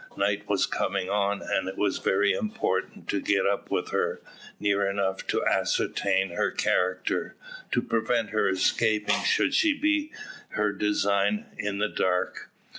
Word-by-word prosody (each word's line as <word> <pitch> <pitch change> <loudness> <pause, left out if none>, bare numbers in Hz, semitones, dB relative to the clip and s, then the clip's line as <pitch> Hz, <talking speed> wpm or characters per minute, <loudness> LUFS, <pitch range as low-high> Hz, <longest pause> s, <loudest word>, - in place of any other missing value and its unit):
Night 100 +1 0
was 100 -2 +2
coming 90 - -2
on, 100 0 0
and 95 - -1
it 95 - -8
was 100 -2 0
very 100 +1 +2
important 215 - -2
to 100 - 0
get 100 -2 +1
up 100 0 -1
with - - -2
her, - - 0 0.4
near 100 -1 +1
enough 95 -1 -2
to - - 0
ascertain 95 -1 +1
her 85 - 0
character, 90 0 0 0.4
to - - +1
prevent 115 -1 0
her 110 -2 +2
escaping, 105 +3 +2
should - - +2
such - - +4 0.2
be 305 0 +1 0.5
her 105 -1 +1
design, 100 0 +1
in 100 -1 -3
the 105 +1 +1
dark. 90 -3 -1
100 Hz, 150 wpm, -27 LUFS, 95-105 Hz, 0.5 s, such